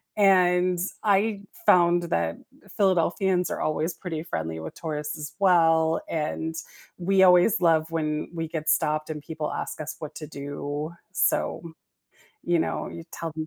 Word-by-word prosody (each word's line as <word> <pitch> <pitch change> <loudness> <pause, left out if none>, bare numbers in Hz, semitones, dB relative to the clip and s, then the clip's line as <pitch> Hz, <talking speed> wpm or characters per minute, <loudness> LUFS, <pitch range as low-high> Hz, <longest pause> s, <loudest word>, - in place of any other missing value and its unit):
and 180 -3 +4 0.2
I 205 0 +2 0.3
found 175 0 +5
that 85 - -1 0.4
Philadelphians 185 -1 +2
are - - -3
always 155 +2 -1
pretty 165 -3 -5
friendly 80 - -4
with 80 0 -7
tourists 150 -1 -4
as 150 0 -7
well, 165 -4 +4
and 160 +1 -2 0.4
we 190 +2 +2
always 185 +3 +5
love 160 -1 +3
when 155 -2 -2
we 165 -1 -3
get 155 -1 -5
stopped 155 +1 +1
and 150 -1 -6
people 155 -1 -4
ask - - -5
us 155 -1 -5
what 155 -1 -7
to 155 - -7
do. 145 +1 -5 0.2
So, - - +1 0.8
you 175 -1 +2
know, - - -2
you 165 - -9
tell 165 - -5
them 155 0 -4
165 Hz, 150 wpm, -26 LUFS, 155-180 Hz, 0.8 s, found